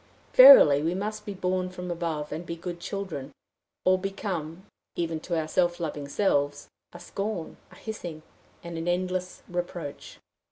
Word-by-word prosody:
Verily 255 - +10
we 165 +3 0
must 210 +2 -4
be 205 - -4
born 185 0 -1
from 180 -1 -6
above, 165 -3 -3
and 155 +3 -4
be 170 - -5
good 175 +1 -6
children, 170 -8 -5 0.5
or 185 0 +4
become, 190 -3 -4 0.3
even 165 -2 -2
to 170 +1 -2
our 155 - -3
self 175 +1 +1
loving 150 -4 -4
selves, 145 -4 0 0.2
a 175 - -11
scorn, 195 0 -5
a - - -15
hissing, 175 -8 -7 0.4
and 170 -1 -6
an 165 - -4
endless 180 +1 -2
reproach. 175 -4 -5
175 Hz, 155 wpm, -27 LUFS, 160-185 Hz, 0.5 s, Verily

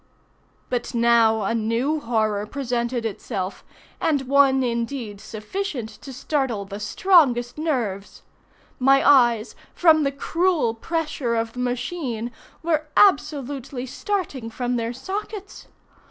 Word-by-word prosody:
But 245 0 -2
now 230 -2 +4
a 195 - 0
new 230 +7 0
horror 215 -5 0
presented 240 -2 -2
itself, 200 -3 -4 0.4
and 290 -4 +1
one 270 0 +4
indeed 235 -3 -3
sufficient 235 - -4
to 275 - -9
startle 255 -5 -2
the 200 +1 -7
strongest 245 - +3
nerves. 230 -11 -2 0.6
My 270 +1 +4
eyes, 240 -6 +4 0.2
from 320 -3 +5
the 275 -2 +1
cruel 325 -2 +1
pressure 300 -2 -2
of 225 0 -1
the 250 - -8
machine, 245 -1 -3 0.3
were 310 -2 0
absolutely 280 -7 +2
starting 290 - -3
from 245 +2 -2
their 230 -1 -1
sockets. 395 - -6
250 Hz, 115 wpm, -23 LUFS, 230-290 Hz, 0.6 s, from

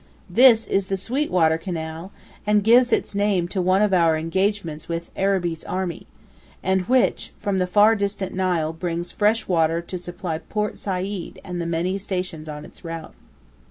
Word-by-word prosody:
This 230 +2 +6
is 195 -1 0
the 195 - -1
"sweet 255 +10 -1
water" 160 -2 +3
canal, 165 +1 -5 0.4
and 210 -1 +3
gives 245 +3 +5
its - - +1
name 200 -3 +1
to 190 - -1
one 185 +3 +3
of 205 -2 +2
our 165 -3 +4
engagements 170 -1 -1
with 170 0 -4
Arabi's 180 -4 0
army, 185 -3 -4 0.6
and 190 0 +2
which, 255 -1 +2
from 200 -2 -1
the 180 - +1
far 210 +4 +5
distant 200 -2 -2
Nile, 175 -4 0
brings 170 +1 -3
fresh 215 +2 +1
water 165 -2 +2
to 175 +2 -6
supply 175 -2 -5
Port 210 +3 -3
Said 190 -1 -4
and 180 -2 -4
the 170 - -3
many 175 +4 -1
stations 180 -5 -4
on 150 0 -7
its - - -15
route. 165 -1 -7
185 Hz, 170 wpm, -23 LUFS, 165-200 Hz, 0.6 s, This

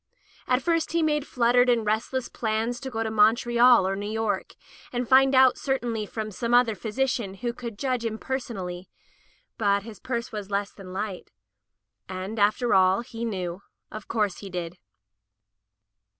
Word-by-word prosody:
At 250 +1 +2
first 330 -1 0
he 335 -1 +2
made 300 -2 0
fluttered 245 +1 +3
and 235 -2 +2
resdess 225 +4 -1
plans 225 +2 -2
to 270 - -6
go 225 -2 -2
to 220 - -3
Montreal 235 0 +5
or 195 - -1
New 205 +1 -4
York 220 -1 -2 0.4
and 245 -1 -2
find 265 +1 +5
out 260 0 +5
certainly 240 -6 -2
from 215 0 -5
some 235 +4 0
other 245 -2 +4
physician 220 0 -2
who 235 +4 -3
could 235 -3 -7
judge 255 -1 -1
impersonally, 220 -6 -4 0.7
but 200 -2 +2
his 220 -2 -10
purse 235 -1 -4
was 210 -2 -6
less 200 0 -1
than 190 -2 -11
light. 195 0 -5 0.8
And, 190 +4 -5
after 215 +4 +2
all, 190 +2 +4
he 230 -1 -7
knew 185 -5 -3 0.2
— - - -53
of 215 -1 -8
course 210 -5 -1
he 200 - -8
did. 175 -1 -5
225 Hz, 165 wpm, -26 LUFS, 200-245 Hz, 0.8 s, Montreal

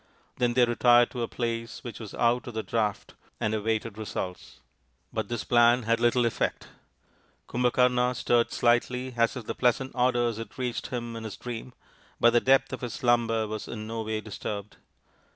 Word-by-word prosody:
Then 120 -1 +1
they 125 -1 +6
retired 120 0 +4
to 125 - -4
a 115 - -1
place 115 -1 -4
which 120 - -7
was 110 -3 -8
out 120 0 +1
of 120 - -7
the 110 - -2
draught 105 -3 -2 0.3
and 110 - 0
awaited 110 0 -2
results. 95 -4 -6 0.5
But - - -2
this 120 - -2
plan 120 0 +4
had 115 +1 +1
little 120 +1 +3
effect. 115 - -2 0.8
Kumbhakarna 125 0 +2
stirred 120 -1 +2
slightly 125 +2 +1
as 115 +1 +2
if 120 - -7
the - - -3
pleasant 130 +1 +1
odours 120 -2 +1
had 115 - -8
reached 125 -2 -3
him 120 -2 -5
in 115 - -6
his 110 -3 -6
dream, 125 0 -7 0.5
but 120 - +6
the 120 - +5
depth 135 0 +3
of 130 - -5
his 125 -3 -4
slumber 115 -2 +2
was 110 0 -5
in 110 -2 -6
no 115 +1 -4
way 110 0 -3
disturbed. 105 -1 -6
120 Hz, 180 wpm, -27 LUFS, 110-125 Hz, 0.8 s, they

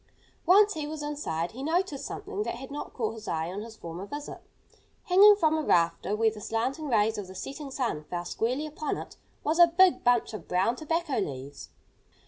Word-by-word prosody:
Once 410 +3 +6
he 305 -2 -4
was 305 0 -5
inside, 180 - -3
he 255 - -9
noticed 320 -1 -1
something 410 - -5
that 425 - -2
had 265 +3 -9
not 290 - -6
caught 225 -3 -2
his 220 -1 -10
eye 160 +1 -2
on 200 +3 -5
his 225 0 -9
former 170 -1 -7
visit. 290 +6 -7 0.6
Hanging 410 +2 +7
from 315 -6 +2
a 315 - 0
rafter, 175 - +2
where 220 +1 +2
the 210 -1 -10
slanting 260 +9 -2
rays 220 -3 +2
of 200 - -6
the 190 - -11
setting 275 +9 -6
sun 240 - -2
fell 175 +1 -4
squarely 250 +10 -1
upon 305 0 -3
it, - - -9 0.3
was 315 +3 0
a 345 - +9
big 360 +2 +4
bunch 245 -2 +2
of 215 - -8
brown 190 +7 +1
tobacco 315 +1 -2
leaves. 140 - -6
255 Hz, 200 wpm, -28 LUFS, 205-310 Hz, 0.6 s, a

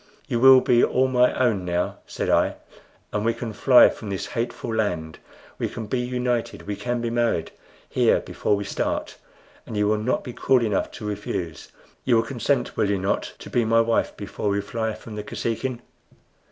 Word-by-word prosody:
"You 120 - -1
will 130 +1 +8
be 120 -1 +4
all 130 +1 +3
my 125 -1 +4
own 115 -7 +2
now," 90 0 -1
said - - -3
I, - - +2 0.6
"and 105 - -1
we 115 +1 +1
can 115 -2 -5
fly 120 +4 +7
from 110 - -8
this 95 -1 -3
hateful 115 0 -3
land. 90 -8 -2 0.4
We - - -1
can 115 - -6
be 125 +4 -1
united 125 -1 -2
we 105 - -3
can 120 +3 -2
be 115 -1 -2
married 120 -8 0 0.4
here - - +3
before 105 - -1
we 100 - -3
start 100 - -3 0.5
and 110 - -5
you 105 0 +2
will 105 0 +2
not 120 +4 -1
be 125 - -7
cruel 130 -1 +2
enough 105 -3 0
to 105 - -8
refuse. 95 -6 -5 0.3
You 125 - +3
will 115 - +4
consent, 135 +3 -1
will 105 - +1
you 100 - +1
not, 95 +2 -2
to - - -10
be 120 - +2
my 115 +1 +4
wife 115 0 0
before 100 0 -3
we 100 0 +1
fly 110 +2 -3
from 115 - -11
the 105 - -4
Kosekin?" 120 +3 -3
115 Hz, 195 wpm, -24 LUFS, 105-120 Hz, 0.6 s, will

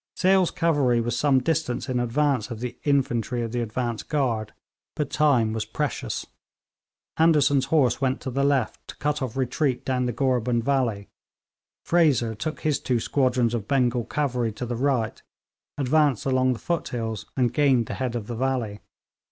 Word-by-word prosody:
Sale's 190 -1 +3
cavalry 145 -8 +2
was 120 0 -1
some 135 0 +3
distance 160 -6 -1
in 130 -2 -1
advance 125 -1 0
of 115 -3 -6
the 125 0 -5
infantry 125 -4 +1
of 115 - -4
the 120 0 -1
advance 115 0 -2
guard, 120 -8 -1 0.4
but 150 -3 -2
time 125 -8 +3
was 110 -1 -2
precious. 105 - -3 0.9
Anderson's 145 -4 +4
horse 135 -4 +2
went 130 -1 +1
to 130 - -4
the 135 +2 0
left, 140 -2 0
to - - -9
cut 150 0 -1
off 130 -1 -4
retreat 130 0 0
down 125 -1 0
the - - 0
Gorebund 125 -2 0
valley. 120 -7 0 0.8
Fraser 145 -9 +3
took 155 +9 -5
his 150 -3 +1
two 125 -2 0
squadrons 125 -2 +1
of 110 -3 -3
Bengal 125 -3 +1
cavalry 125 -6 -1
to 125 - -5
the 120 0 -3
right, 125 -3 0 0.6
advanced 145 -2 +2
along 130 -1 +2
the - - -6
foothills, 115 - -3
and 125 -2 +2
gained 135 -4 +3
the - - -5
head 125 -2 -3
of 115 -3 -3
the 120 - -5
valley. 120 -4 -1
130 Hz, 170 wpm, -25 LUFS, 120-140 Hz, 0.9 s, Anderson's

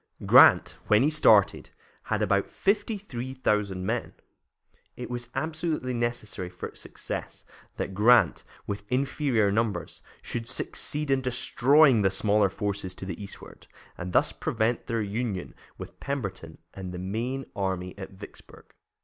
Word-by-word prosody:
Grant, - - +6
when 105 +3 +5
he 150 - +3
started, 110 -10 +4 0.4
had - - 0
about - - +1
thirty 205 +2 0
three 130 - -6
thousand 100 -7 0
men. 115 +3 -2 0.8
It 125 0 -7
was 120 -1 -5
absolutely 155 -5 -2
necessary 120 -6 -3
for 90 - -8
success - - -6 0.3
that 95 - -3
Grant, 115 +5 +4 0.2
with 100 +2 -6
inferior 130 -5 +1
numbers, 110 0 -2 0.2
should 115 0 -5
succeed 150 +2 -1
in 135 -1 +2
destroying 130 +1 +4
the 95 - +3
smaller 100 +1 +2
forces 100 -1 -3
to - - -6
the 95 0 -6
eastward, 100 - -11 0.3
and 90 +1 -6
thus - - +3
prevent 115 +2 -1
their 115 -2 -1
union 105 -2 -3 0.2
with - - -10
Pemberton 100 - -5 0.2
and 95 -2 -7
the 90 - -6
main 115 +9 -3
army 95 -2 -3
at 95 -1 -8
Vicksburg. 95 - -14
115 Hz, 140 wpm, -27 LUFS, 100-130 Hz, 0.8 s, Grant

